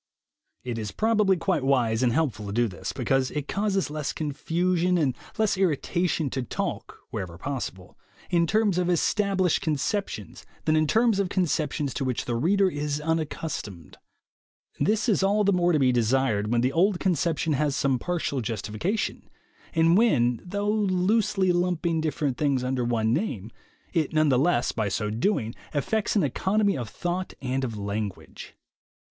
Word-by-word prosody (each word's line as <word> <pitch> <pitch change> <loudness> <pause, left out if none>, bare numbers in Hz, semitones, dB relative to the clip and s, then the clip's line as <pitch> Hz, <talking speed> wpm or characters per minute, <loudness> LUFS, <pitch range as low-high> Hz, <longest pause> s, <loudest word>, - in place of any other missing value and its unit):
It 120 -2 -4
is 105 -2 -4
probably 210 - +2
quite 170 -2 0
wise 125 -4 +2
and 125 -2 +3
helpful 115 -8 -1
to - - -4
do 120 +3 +2
this, 95 -5 -5
because 135 -1 0
it 150 -2 -4
causes 195 -5 0
less 150 -2 -3
confusion 175 +4 0
and 140 -6 +1 0.2
less 215 -3 +1
irritation 175 -3 0
to 130 - -2
talk, 125 - -4
wherever 85 -3 -5
possible, 95 -6 -6 0.3
in 170 -1 +3
terms 210 -3 +2
of 180 -1 0
established 190 +1 +1
conceptions 150 - -2 0.2
than 155 - +3
in 155 0 +3
terms 225 +2 +3
of 195 -2 0
conceptions 155 -6 -1
to - - -2
which 130 -2 -2
the 120 - -2
reader 190 +10 +3
is 150 -3 -2
unaccustomed. 150 - -4 0.8
This 215 +3 +1
is 210 -5 +3
all 205 +2 +3
the 200 0 +3
more 175 -1 +3
to 160 - +3
be 130 -3 +3
desired 120 -3 +1
when 120 -1 +2
the 130 +2 +1
old 185 +3 +2
conception 165 -3 0
has 145 0 0
some 135 -4 +1
partial 165 -6 -2
justifica 110 - -2
tion, - - -4 0.4
and 165 +1 +4
when, 125 - +3
though 200 +3 -3
loosely 195 -1 +2
lumping 175 -2 0
different 150 -4 -1
things 140 -4 +1
under 130 -1 -1
one 115 -2 +1
name, 120 - -2 0.4
it 160 -4 0
none 155 -1 +3
the 125 -2 +3
less, 145 -4 +2
by 110 -2 -1
so 105 +2 -2
doing, 115 - 0 0.2
effects 215 +11 0
an 205 - +3
economy 200 - +1
of 120 -5 -4
thought 175 - -3
and 130 0 -2
of 115 -4 -3
language. 100 0 -5
155 Hz, 165 wpm, -26 LUFS, 125-185 Hz, 0.8 s, and